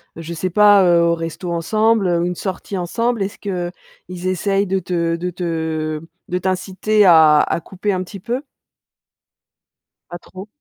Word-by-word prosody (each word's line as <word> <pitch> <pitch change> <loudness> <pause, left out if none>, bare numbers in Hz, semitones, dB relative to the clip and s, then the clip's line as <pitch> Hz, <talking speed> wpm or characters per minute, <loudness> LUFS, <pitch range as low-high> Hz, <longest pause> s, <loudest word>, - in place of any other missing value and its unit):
je 165 +1 -7
sais 185 +3 -2
pas, 205 +1 +6
heu, 170 -1 +4
au 170 0 +3
resto 165 +2 -5
ensemble 215 +5 +1
ou 170 -1 +1
une 180 0 -2
sortie 190 +1 -5
ensemble, 230 +6 -1
est-ce 200 +3 -5
qu'ils 180 -1 -7
essayent 195 +2 0
de 190 +1 0
te 170 -2 -1
de 175 +2 -3
te, 160 -3 -3 0.3
de 180 - -1
t'inciter 190 +3 +1
à 160 -4 +7
à - - -1
couper 195 +4 -3
un 185 0 -2
petit 195 +2 -10
peu? 240 +7 -3 1.7
Pas 175 - -6
trop. 190 +4 -11
180 Hz, 160 wpm, -19 LUFS, 170-195 Hz, 1.7 s, à